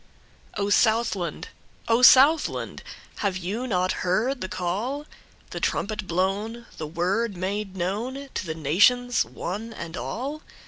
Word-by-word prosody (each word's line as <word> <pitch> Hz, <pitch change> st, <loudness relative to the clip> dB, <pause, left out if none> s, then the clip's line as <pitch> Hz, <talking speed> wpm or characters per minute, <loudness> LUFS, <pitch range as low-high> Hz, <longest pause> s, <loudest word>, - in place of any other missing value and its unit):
O 200 Hz, 0 st, 0 dB
SOUTHLAND! 205 Hz, -8 st, +1 dB, 0.4 s
O 230 Hz, +1 st, +3 dB
Southland! 275 Hz, +5 st, +5 dB, 0.4 s
Have 195 Hz, -3 st, -1 dB
you 205 Hz, +8 st, -3 dB
not 185 Hz, -4 st, +1 dB
heard 225 Hz, +9 st, 0 dB
the 185 Hz, -, -3 dB
call, 215 Hz, +13 st, -2 dB, 0.5 s
The -, -, -4 dB
trumpet 210 Hz, -2 st, -2 dB
blown, 200 Hz, +7 st, -1 dB
the 155 Hz, -, -4 dB
word 185 Hz, +6 st, -1 dB
made 195 Hz, +2 st, -3 dB
knownTo 235 Hz, +10 st, -3 dB
the 160 Hz, -4 st, -5 dB
nations, 210 Hz, -, +3 dB
one 210 Hz, +6 st, -5 dB
and 170 Hz, -5 st, -7 dB
all? 280 Hz, +10 st, -4 dB
205 Hz, 125 wpm, -25 LUFS, 185-240 Hz, 0.5 s, Southland